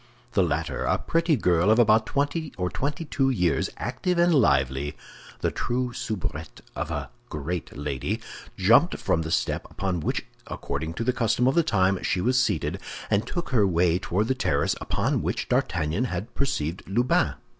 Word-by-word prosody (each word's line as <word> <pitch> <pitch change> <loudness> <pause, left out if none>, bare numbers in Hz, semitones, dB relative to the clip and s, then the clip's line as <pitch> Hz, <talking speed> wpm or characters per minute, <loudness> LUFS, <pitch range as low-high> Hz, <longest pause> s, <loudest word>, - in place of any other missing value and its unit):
The 100 - +3
latter—a 80 -2 0
pretty 165 -1 +1
girl 90 -5 +2
of 110 - +5
about 110 -2 +4
twenty 145 +2 -1
or 90 -1 -1
twenty 145 +4 -2
two 135 -2 +1
years, 90 - +1
active 150 +9 -2
and 175 0 +4
lively, 70 - +2 0.4
the - - +1
true 125 0 -2
soubrette 80 -9 -5
of - - -3
a - - -4 0.2
great 75 +2 -4
lady—jumped 70 -3 +1
from 80 - 0
the 80 - -4
step 80 - -1
upon 95 -3 -2
which, 75 - -2 0.2
according 80 +4 -4
to 115 - -2
the 125 +2 +1
custom 120 0 +1
of 130 - +4
the 170 - +4
time, 95 - +2
she 95 - 0
was 125 +6 +2
seated, - - -1 0.3
and 100 +2 +2
took 175 -4 -3
her 110 -7 +3
way 85 -1 +2
toward 100 +3 0
the 130 - +2
terrace 130 - +1
upon - - 0
which - - -2
D'Artagnan 85 +7 0
had 100 0 -4
perceived 90 - -1
Lubin. 120 +6 +2
100 Hz, 165 wpm, -26 LUFS, 80-130 Hz, 0.4 s, of